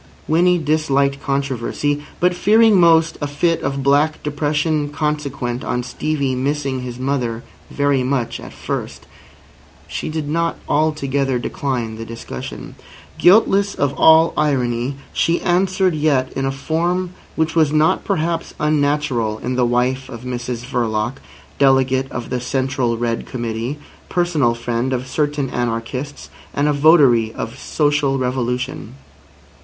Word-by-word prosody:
Winnie 175 +3 +4
disliked 140 -3 +1
controversy. 140 +1 -1 0.2
But 180 +1 +3
fearing 215 +2 +4
most 165 -1 +4
a 145 - -1
fit 165 +4 0
of 135 0 -2
black 145 +3 +2
depression 150 0 0
consequent 145 -5 -2
on 125 0 -2
Stevie 140 +1 -2
missing 135 0 -1
his 125 -1 -6
mother 125 -3 -2 0.3
very 140 -2 +1
much 125 -2 -1
at - - -10
first, - - -5 0.8
she - - -5
did 155 -1 -3
not 165 +2 0
altogether 140 -3 +1
decline 120 -3 -3
the 115 - -6
discussion. 65 - -8 0.5
Guiltless 200 +1 +4
of 140 -1 0
all 160 +1 +5
irony, 130 -3 0 0.2
she 170 +1 +1
answered 185 +1 +2
yet 145 -4 +1
in 135 0 -1
a - - 0
form 170 +6 -1 0.2
which 160 0 0
was 155 -3 +3
not 155 +1 +2
perhaps 165 +1 -2
unnatural 145 -7 +1
in 125 +3 -3
the 125 -1 +2
wife 130 +2 0
of 115 -2 -8
Mr 125 -1 -4
Verloc, 120 -1 -1 0.4
Delegate 135 -1 +3
of 120 -1 -6
the 125 -1 -1
Central 130 -2 -1
Red 115 0 -2
Committee, 120 +3 -3 0.3
personal 160 -10 +1
friend 120 +2 -2
of 125 0 -2
certain 145 0 -1
anarchists, 120 +4 -4 0.2
and 145 +1 +1
a 150 - +2
votary 140 -7 +5
of 115 +4 -6
social 145 -2 +1
revolution. 125 - -3
140 Hz, 135 wpm, -19 LUFS, 125-155 Hz, 0.8 s, all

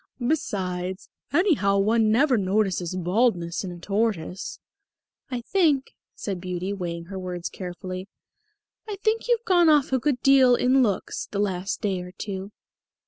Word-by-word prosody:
Besides, 185 - -2 0.2
anyhow 285 - +3
one 215 +2 +3
never 260 +4 +4
notices 190 -3 0
baldness 180 -1 +1
in 185 - -5
a 175 - -8
tortoise." 195 -2 -2 0.7
"I 250 -2 -3
think," 300 -3 +1 0.2
said 190 -4 -4
Beauty, 185 +1 -3
weighing 170 -3 -4
her 190 +2 -6
words 180 -2 -4
carefully, 185 +1 -6 0.8
"I 415 - -3
think 440 +1 +1
you've 475 -1 +1
gone 350 -5 +5
off 290 -3 +3
a 260 - +3
good 270 0 0
deal 265 -2 +6
in 255 +2 +3
looks 205 -6 -1
the 200 - -5
last 195 -2 -1
day 195 -4 -1
or 180 0 -9
two." 195 0 -6
200 Hz, 145 wpm, -25 LUFS, 185-260 Hz, 0.8 s, deal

